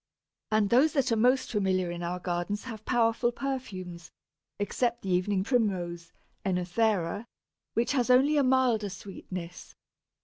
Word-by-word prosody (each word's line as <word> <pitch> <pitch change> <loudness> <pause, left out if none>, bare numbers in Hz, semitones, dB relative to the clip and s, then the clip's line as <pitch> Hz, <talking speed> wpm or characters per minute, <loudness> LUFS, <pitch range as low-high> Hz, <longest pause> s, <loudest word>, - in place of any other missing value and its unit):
And 215 -2 +2
those 275 +6 +5
that 270 -4 +1
are - - +4
most 250 +4 +2
familiar 185 -4 +1
in 175 0 -5
our 175 +1 -2
gardens 175 +3 -2
have 220 -4 -8
powerful 235 0 +2
perfumes, 190 -11 -5 0.5
except 235 +4 -1
the 190 - -2
Evening 185 +2 +1
Primrose 180 -8 -1 0.3
(Oenothera), 190 +2 0 0.5
which 235 +2 +1
has 255 -4 +1
only 265 +4 +5
a 290 - +4
milder 255 -5 +2
sweetness. 180 -2 -8
210 Hz, 135 wpm, -29 LUFS, 180-245 Hz, 0.5 s, those